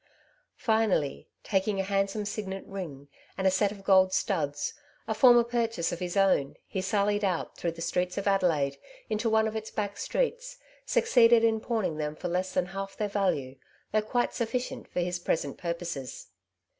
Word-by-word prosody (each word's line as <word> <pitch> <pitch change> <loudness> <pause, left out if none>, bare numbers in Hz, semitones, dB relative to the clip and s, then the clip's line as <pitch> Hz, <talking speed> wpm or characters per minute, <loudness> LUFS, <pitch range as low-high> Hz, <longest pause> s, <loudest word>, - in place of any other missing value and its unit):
Finally, 220 - +1
taking 195 0 0
a - - +1
handsome 195 +2 0
signet 195 -2 -4
ring, 160 -8 -7 0.3
and 190 -1 +2
set 200 +1 +2
of 200 -2 -10
gold 190 -1 +5
studs, 155 -7 -1 0.3
a - - 0
former 240 -2 +7
purchase 230 -7 -1
of 175 - -4
his 180 +1 -3
own, 190 -8 +3
he 190 - -3
sallied 205 +1 +1
out 185 -4 -1
through 170 - -2
the 165 0 -6
streets 180 +1 -1
of 200 - -2
Adelaide 165 -9 +2 0.3
into 220 +2 +1
one 220 0 +3
of 220 - -4
its 220 0 -4
back 205 -1 -3
streets, - - -2 0.3
succeeded 240 - +5
in 225 -1 +3
pawning 215 -8 -1
them 150 0 -3
for 180 - -4
less 185 +2 -1
than 185 -1 +1
half 195 +1 -6
their 210 - 0
value> 180 -10 0 0.4
though 215 - +3
quite 240 +3 0
suffi 235 +2 -1
cient - - -10
for 180 - -2
his 175 0 -2
present 145 -5 -2
purposes. 170 - -5
195 Hz, 175 wpm, -28 LUFS, 175-220 Hz, 0.4 s, former